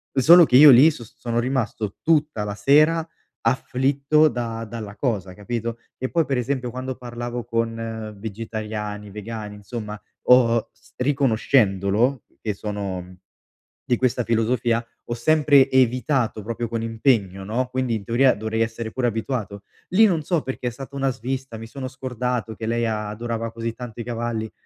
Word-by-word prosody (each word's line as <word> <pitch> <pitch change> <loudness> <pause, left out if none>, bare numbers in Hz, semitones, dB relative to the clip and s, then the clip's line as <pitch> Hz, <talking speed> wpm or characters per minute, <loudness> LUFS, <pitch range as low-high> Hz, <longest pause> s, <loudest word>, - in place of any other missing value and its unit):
solo 165 +6 +8
che 125 - +1
io 145 +1 +10
lì, 130 +6 +8
so 135 -7 -7
s 110 - -16
sono 120 -1 -3
rimasto 120 -5 -2
tutta 150 -8 +1
la 105 0 -4
sera 155 +8 +4 0.3
afflitto 135 +5 +2
da 115 -2 -4
dalla 110 -2 -7
cosa, 100 -8 -2
capito? 115 +2 -4 0.2
E 130 - -2
poi, 165 -2 +1
per 135 -3 0
esempio, 125 -1 -2
quando 130 0 -5
parlavo 120 0 -5
con 115 -2 -3
vegetariani, 105 -1 -5
vegani, 105 0 -6
insomma 105 0 -7 0.3
ho 120 -2 +5
s 115 0 -25
riconoscendolo 120 -3 +2 0.2
che 105 -3 -2
sono, 100 -3 -4
mhmm, 90 +1 -14 0.7
di 120 - +1
questa 125 -1 +1
filosofia, 115 +1 +1 0.2
ho 120 - -3
sempre 140 +1 +4
evitato 125 -2 +1
proprio 115 +1 -3
con 115 0 -3
impegno, 110 -5 +1
no, 120 +5 -1
quindi 130 -2 -1
in 105 - -4
teoria 125 +5 +3
dovrei 110 +1 -2
essere 115 0 -2
pure 130 -1 -2
abituato. 110 -3 -3 0.3
Lì, 215 +5 +6
non 165 -5 0
so 170 -3 0
perché, 130 -1 -4
è - - +2
stata 135 +3 -10
una 135 -1 +1
svista, 130 0 -5
mi 115 0 -8
sono 130 +2 -6
scordato 125 -3 -3
che 110 - -6
lei 115 0 0
a 105 -1 -2
adorava 115 +1 -4
così 115 0 -4
tanto 120 -2 -9
i - - -3
cavalli. 115 -2 -3
115 Hz, 165 wpm, -23 LUFS, 110-130 Hz, 0.7 s, io